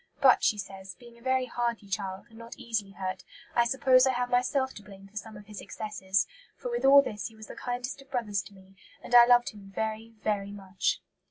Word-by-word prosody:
"But," 265 -2 +6
she 210 - +3
says, 195 -2 -7
"being 235 -1 -16
a - - -21
very 260 +1 +1
hardy 235 -4 -2
child, 195 -1 -4
and 225 - -14
not 230 0 -10
easily 220 -4 -2
hurt, 185 -1 -4 0.3
I 235 - +4
suppose 255 +1 +5
I 260 - +2
had 245 0 -1
myself 260 +2 +1
to - - -10
blame 195 -1 -13
for 205 - -25
some 215 0 -6
of 205 - -12
his 210 -1 -9
excesses; 195 -3 -1 0.3
for - - -5
with 475 - -1
all 280 +1 +9
this 210 -4 -4
he 225 - -14
was 220 0 -11
the - - -10
kindest 245 +2 -4
of 275 - -18
brothers 215 -7 -1
to 200 - -17
me, 190 0 -18 0.3
and - - -8
I 240 -1 +10
loved 245 0 +5
him 200 -2 -13
very, 220 +1 -3
very 200 -2 -1
much." 195 -1 -2
220 Hz, 230 wpm, -29 LUFS, 200-245 Hz, 0.3 s, I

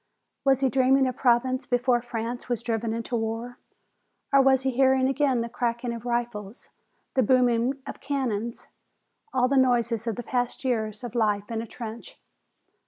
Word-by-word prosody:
Was 270 -1 +3
he 265 - +3
dreaming 265 0 +4
of 255 -1 -2
Provence 255 +1 +2
before 245 0 +2
France 240 +1 -5
was 240 -1 -1
driven 225 -1 -1
into 230 +2 -3
war? 225 +2 -3 0.7
Or 275 - +7
was 265 -1 +4
he 265 - +1
hearing 265 +1 +3
again 270 -3 +1
the 230 - -2
cracking 235 0 -2
of 230 0 -8
rifles, 235 -2 -3 0.4
the 265 - +3
booming 250 +1 +3
of - - -8
cannon, 235 -5 -1 0.8
all 250 -1 +2
the 275 +1 +1
noises 235 -3 +2
of 225 - -1
the 245 - -5
past 245 +2 -2
year 230 -4 +1
of 215 +2 -8
life 210 -3 0
in 225 -1 -2
a 230 - -7
trench? 230 0 -8
240 Hz, 170 wpm, -26 LUFS, 230-260 Hz, 0.8 s, Or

